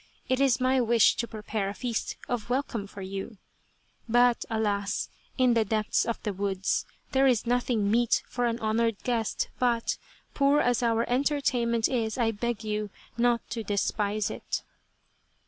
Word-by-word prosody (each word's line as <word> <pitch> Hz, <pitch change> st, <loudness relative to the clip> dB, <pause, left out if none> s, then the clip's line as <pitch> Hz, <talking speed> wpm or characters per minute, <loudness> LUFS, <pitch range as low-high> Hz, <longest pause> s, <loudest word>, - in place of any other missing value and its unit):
It 260 Hz, 0 st, +1 dB
is 270 Hz, -3 st, +4 dB
my 255 Hz, 0 st, +3 dB
wish 235 Hz, -2 st, +5 dB
to 235 Hz, -, -1 dB
prepare 215 Hz, -2 st, -3 dB
a 200 Hz, -, -6 dB
feast 240 Hz, -1 st, -3 dB
of 240 Hz, -2 st, -3 dB
welcome 245 Hz, -5 st, -1 dB
for 200 Hz, -1 st, -9 dB
you, 195 Hz, +3 st, -6 dB, 0.7 s
but 245 Hz, +1 st, +4 dB
alas! 205 Hz, -2 st, -1 dB, 0.3 s
in 255 Hz, -2 st, +4 dB
the 230 Hz, -1 st, +3 dB
depths 215 Hz, 0 st, 0 dB
of 230 Hz, -, -1 dB
the 210 Hz, -, -2 dB
woods, 195 Hz, 0 st, -1 dB, 0.2 s
there 270 Hz, 0 st, +4 dB
is 245 Hz, -4 st, +2 dB
nothing 240 Hz, -4 st, +1 dB
meet 235 Hz, +1 st, +3 dB
for 245 Hz, -1 st, -1 dB
an 230 Hz, 0 st, -1 dB
honoured 225 Hz, 0 st, 0 dB
guest, 230 Hz, -3 st, -1 dB
but, 240 Hz, -2 st, +1 dB, 0.3 s
poor 280 Hz, +1 st, +4 dB
as 245 Hz, -1 st, +2 dB
our 230 Hz, -1 st, +1 dB
entertainment 245 Hz, -4 st, +1 dB
is, 225 Hz, -3 st, -1 dB
I 230 Hz, -2 st, +2 dB
beg 225 Hz, 0 st, -3 dB
you, 210 Hz, -1 st, -2 dB, 0.3 s
not 240 Hz, 0 st, +1 dB
to 230 Hz, -2 st, -3 dB
despise 205 Hz, 0 st, 0 dB
it." -, -, -4 dB
230 Hz, 160 wpm, -28 LUFS, 215-245 Hz, 0.7 s, wish